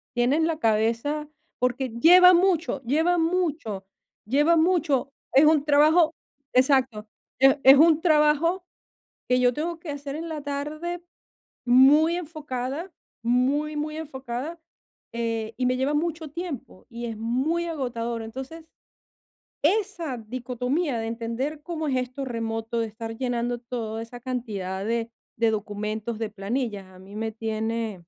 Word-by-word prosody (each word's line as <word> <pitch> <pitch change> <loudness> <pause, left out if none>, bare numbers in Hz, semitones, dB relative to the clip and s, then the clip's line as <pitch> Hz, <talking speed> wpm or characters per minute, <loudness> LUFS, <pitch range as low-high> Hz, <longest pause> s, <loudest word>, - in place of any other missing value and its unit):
tienen 270 +7 +2
la 320 -1 -2
cabeza 230 +8 0 0.3
porque 250 +1 0
lleva 360 +10 +7
mucho, 340 -6 +2
lleva 320 +8 +2
mucho. 320 - -1 0.4
Lleva 295 +7 +3
mucho. 315 -5 +1 0.2
Es 275 +3 +7
un 305 -2 +4
trabajo 310 +3 +5 0.4
exacto, 255 -5 +2 0.3
es 270 +2 +6
es 270 +1 +9
un 320 0 +5
trabajo 320 +3 +3 0.6
que 250 0 +3
yo 245 0 +4
tengo 330 +2 -3
que 325 - -7
hacer 285 0 -5
en 330 +1 -5
la 310 -2 -4
tarde 305 +5 -4 0.6
muy 290 +7 +6
enfocada, 300 0 -5 0.3
muy, 275 +6 +1
muy 305 +1 -3
enfocada, 275 +2 -6 0.5
eh, 230 -1 -3
y 250 0 0
me 255 0 +2
lleva 270 +3 0
mucho 320 0 -2
tiempo 315 - -7
y 235 0 -6
es 225 -2 -5
muy 270 +10 0
agotador. 240 -7 -3
Entonces, 265 +8 -8 1.0
esa 355 - 0
dicotomía 250 +5 -2
de 225 - -3
entender 235 +6 -4
cómo 320 -2 -4
es 265 - 0
esto 255 +2 -3
remoto, 225 -1 -3
de 225 - 0
estar 225 +1 -7
llenando 245 -1 -2
todo 230 -2 -5
esa 240 +1 -9
cantidad 205 -7 -4
de 230 0 -1 0.3
de 230 -1 +3
documentos, 215 +2 -4
de 220 -2 -2
planillas, 210 0 -3
a 185 -1 -16
mí 195 +2 -13
me 220 +1 -3
tiene 220 -2 -3
265 Hz, 140 wpm, -25 LUFS, 230-310 Hz, 1.0 s, es